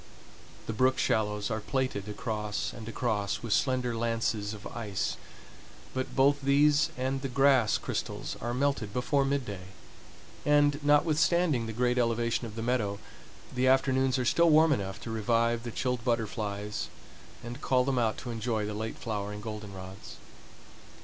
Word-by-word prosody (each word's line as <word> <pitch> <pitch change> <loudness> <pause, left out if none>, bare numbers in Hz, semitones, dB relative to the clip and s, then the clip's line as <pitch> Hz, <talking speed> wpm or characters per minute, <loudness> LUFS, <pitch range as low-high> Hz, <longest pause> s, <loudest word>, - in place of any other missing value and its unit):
The 110 - -3
brook 130 +3 +3
shallows 105 0 0
are 110 - -1
plaited 110 -3 -2
across 105 -1 -3
and 115 -1 -8
across 110 -4 -1
with 115 -3 0
slender 125 -2 +1
lances 115 -2 -1
of 105 - -12
ice, 105 -5 -3 0.8
but 130 0 -3
both 140 +2 +4
these 145 +2 +4
and 130 +1 -1
the 135 - -2
grass 130 -4 +4
crystals - - -4
are 120 - -2
melted 125 -5 0
before 135 +3 +1
midday, 125 -10 -2 0.8
and, 145 0 +3
notwithstanding 150 -2 +3
the - - -3
great 125 +2 +1
elevation 115 0 0
of 110 - -10
the 115 - -4
meadow, 115 -5 0 0.6
the 130 0 +1
afternoons 130 0 +3
are 125 - -1
still 170 +6 +4
warm 155 +1 +6
enough 95 -6 -3
to 115 - -6
revive 115 +1 +1
the 120 - -5
chilled 125 0 -2
butterflies 105 -3 -2 0.6
and 120 +3 -7
call 130 -1 +3
them 130 -1 0
out 110 -2 +1
to 120 - -6
enjoy 110 -1 -1
the 105 - -4
late 110 +2 -4
flowering 105 -2 -4
goldenrods. 100 -2 -8
120 Hz, 150 wpm, -29 LUFS, 105-130 Hz, 0.8 s, warm